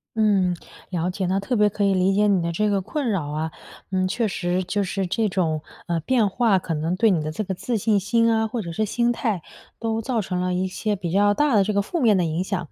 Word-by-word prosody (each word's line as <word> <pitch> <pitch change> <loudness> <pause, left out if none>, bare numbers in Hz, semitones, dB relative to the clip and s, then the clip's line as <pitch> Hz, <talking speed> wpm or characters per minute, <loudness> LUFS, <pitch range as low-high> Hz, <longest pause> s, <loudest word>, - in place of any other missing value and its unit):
嗯， 200 -5 +3 0.4
了 175 -1 -1
解， 190 +1 -2
那 190 +1 +1
特 240 +6 -2
别 210 -1 +4
可 205 0 -1
以 195 - +3
理 185 +1 +2
解 210 +1 +3
你 195 -3 +3
的 170 0 -1
这 210 +5 +1
个 200 -1 +1
困 275 - -2
扰 165 -7 -1
啊。 155 +2 -2 0.4
嗯， 185 -1 +1
确 225 +2 0
实 180 -1 -1
就 200 +2 0
是 190 0 -2
这 215 +4 0
种， 165 -5 0 0.3
呃， 170 -1 -1
变 230 +3 +2
化 205 -2 +2
可 165 - -4
能 160 +3 -1
对 225 +1 +4
你 165 -4 +1
的 155 0 -3
这 215 +6 -3
个 190 - -2
自 230 +5 -2
信 210 +1 +2
心 230 +4 +2
啊， 220 0 +2
或 225 +1 -3
者 170 -3 -6
是 215 +6 0
心 240 +3 +1
态， 220 -7 -1 0.4
都 225 -1 -1
造 240 0 -1
成 180 -3 -2
了 180 0 0
一 185 +1 0
些 205 +2 -2
比 175 -2 -4
较 205 +1 +4
大 295 -1 +2
的 200 - +5
这 210 - -1
个 200 0 +2
负 335 - -3
面 220 -5 +4
的 180 - +2
影 165 +3 -1
响。 185 -3 -3
195 Hz, 285 characters per minute, -23 LUFS, 180-220 Hz, 0.4 s, 的